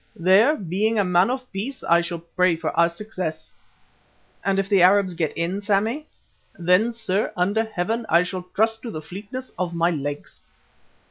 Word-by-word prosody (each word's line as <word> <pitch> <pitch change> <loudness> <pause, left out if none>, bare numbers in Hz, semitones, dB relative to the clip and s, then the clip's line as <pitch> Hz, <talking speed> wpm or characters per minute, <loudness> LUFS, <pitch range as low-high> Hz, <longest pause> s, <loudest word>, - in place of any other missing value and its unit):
There, 195 - +4
being 205 +4 -1
a 205 - +3
man 180 +2 +3
of 255 0 -3
peace, 235 +8 -4
I 170 0 +4
shall 170 0 -4
pray 170 +1 +1
for 160 0 -3
our 170 0 +4
success." 175 -4 -6 0.9
"And 195 -1 +1
if 195 0 0
the 200 -2 +3
Arabs 190 0 +4
get 165 -3 -1
in, 175 +4 -2
Sammy?" 220 +9 0 0.5
"Then, 180 +7 +3
sir, 220 -3 -1
under 200 +5 +1
Heaven, 220 +3 -3
I 170 +2 +5
shall 180 0 -6
trust 225 +1 +1
to 235 - -6
the 155 -7 -6
fleetness 205 +10 -8
of 175 -2 -2
my 170 +1 +2
legs." 145 -2 -5
190 Hz, 175 wpm, -23 LUFS, 170-220 Hz, 0.9 s, I